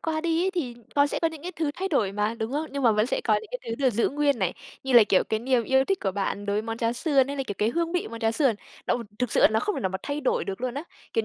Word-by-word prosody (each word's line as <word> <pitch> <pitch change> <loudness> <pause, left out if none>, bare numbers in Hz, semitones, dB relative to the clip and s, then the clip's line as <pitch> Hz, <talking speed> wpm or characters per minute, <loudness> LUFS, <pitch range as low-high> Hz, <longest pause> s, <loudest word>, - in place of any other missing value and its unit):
qua 315 -1 -1
đi 330 0 +1
ấy 380 - +1
thì 315 -10 -3 0.2
nó 285 0 +5
sẽ - - -2
có 330 - +4
những 320 -2 -10
cái 360 +2 -5
thứ 315 -3 0
thay 385 +1 -2
đổi 225 - +1
mà, 210 +2 0
đúng 220 +3 -3
không? 300 +3 -1
Nhưng 280 -1 -3
mà 230 - +5
vẫn 215 +1 +2
sẽ - - -1
có - - +3
những 440 - -3
cái - - -3
thứ 230 - -1
được 260 - +5
giữ 230 +1 +1
nguyên 285 -2 +1
này, 190 -4 0 0.3
như 265 - -2
là, 235 -3 +9
kiểu, 195 -2 +3
cái 220 - -1
niềm 250 0 +2
yêu 265 0 +3
thích 390 +6 0
của 195 - 0
bạn 200 +1 -2
đối 200 - 0
với 210 - 0
món 225 0 -4
cháo 230 0 +1
sườn 270 +1 +2
hay 280 - -4
là, 270 - -1
kiểu, 205 - -3
cái 210 - +2
hương 335 +4 -1
vị 355 - -1
món 230 0 -8
cháo 225 -1 +2
sườn, 265 -2 +2 0.3
nó - - +2 0.2
thực 250 -2 -1
sự - - +3
là - - +8
nó 220 0 +1
không 420 - -1
thể - - -3
nào 190 - 0
mà 190 0 -4
thay 290 +1 -3
đổi 265 - 0
được 195 +2 -5
luôn 250 -1 -2
á, 285 - -3 0.3
kiểu 450 - +1
260 Hz, 345 wpm, -26 LUFS, 220-315 Hz, 0.3 s, là